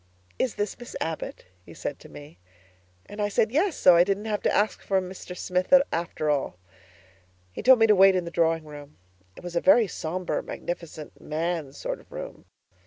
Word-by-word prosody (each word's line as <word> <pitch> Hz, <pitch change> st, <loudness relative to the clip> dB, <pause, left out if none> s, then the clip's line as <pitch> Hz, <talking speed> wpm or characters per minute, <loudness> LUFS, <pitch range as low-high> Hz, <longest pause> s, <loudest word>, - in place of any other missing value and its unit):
'Is 255 Hz, -, 0 dB
this 205 Hz, +2 st, -3 dB
Miss 240 Hz, -, -10 dB
Abbott?' 160 Hz, -1 st, -5 dB, 0.2 s
he -, -, -14 dB
said -, -, -5 dB
to -, -, -14 dB
me, 75 Hz, +3 st, -13 dB, 0.7 s
and 205 Hz, +1 st, -7 dB
I 205 Hz, -, 0 dB
said, 215 Hz, +2 st, +1 dB
'Yes,' 330 Hz, +6 st, +1 dB
so 180 Hz, -2 st, +6 dB
I 170 Hz, -, +6 dB
didn't 200 Hz, +3 st, -2 dB
have 210 Hz, -2 st, -2 dB
to -, -, +1 dB
ask 210 Hz, +1 st, +1 dB
for 195 Hz, -1 st, +1 dB
Mr. 185 Hz, -1 st, -8 dB
Smith 180 Hz, +1 st, -2 dB, 0.2 s
after 165 Hz, -2 st, -3 dB
all. 145 Hz, -11 st, -1 dB, 0.9 s
He -, -, -7 dB
told 260 Hz, +3 st, +7 dB
me 225 Hz, -, +5 dB
to 215 Hz, -, +5 dB
wait 195 Hz, -1 st, +6 dB
in 180 Hz, -2 st, -1 dB
the 170 Hz, -, -6 dB
drawing 165 Hz, -1 st, +1 dB
room. 145 Hz, -1 st, -12 dB, 0.4 s
It -, -, -12 dB
was 175 Hz, -1 st, -7 dB
a 170 Hz, -, +2 dB
very 245 Hz, -5 st, +6 dB
sombre, 180 Hz, -1 st, -3 dB
magnificent, 165 Hz, -3 st, -7 dB
man's 160 Hz, -2 st, -3 dB
sort -, -, -4 dB
of -, -, -21 dB
room. -, -, -8 dB
180 Hz, 195 wpm, -26 LUFS, 160-210 Hz, 0.9 s, told